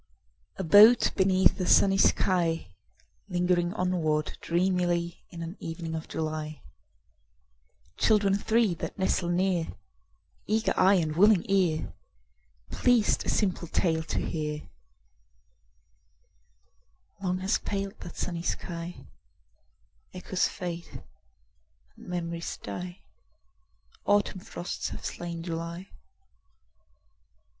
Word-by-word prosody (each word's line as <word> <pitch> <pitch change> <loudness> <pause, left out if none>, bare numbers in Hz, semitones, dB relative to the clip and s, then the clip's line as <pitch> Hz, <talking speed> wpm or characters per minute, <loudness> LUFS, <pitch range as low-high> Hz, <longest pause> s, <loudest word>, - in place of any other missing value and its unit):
A 190 - -3
boat 210 +7 +7
beneath 190 0 +3
a 180 - -1
sunny 195 0 +5
sky, 165 - +2 0.6
Lingering 175 -1 +1
onward 165 -5 0
dreamily 175 -1 0
In 170 -1 -7
an 165 +3 -6
evening 165 0 -5
of 160 0 -5
July— 155 -1 -4 1.3
Children 210 -3 +3
three 220 -1 +2
that 165 - -6
nestle 190 -2 0
near, 175 -1 +1 0.8
Eager 220 +1 +1
eye 195 +2 +5
and 160 -4 0
willing 200 0 +5
ear, 185 -5 +1 0.8
Pleased 245 -4 +2
a - - +1
simple 185 -4 0
tale 160 -1 +1
to 165 - -3
hear— 150 -2 -3 2.5
Long 185 -1 0
has 190 +3 0
paled 200 +1 -4
that 175 - -10
sunny 170 -2 -3
sky: 170 0 -5 1.1
Echoes 185 0 0
fade 175 -2 -7 0.9
and - - -15
memories 170 -1 -4
die. 180 0 -6 1.1
Autumn 205 -2 +2
frosts 175 0 -5
have - - -8
slain 170 -1 -5
July. 170 +2 -5
175 Hz, 100 wpm, -28 LUFS, 165-190 Hz, 2.5 s, boat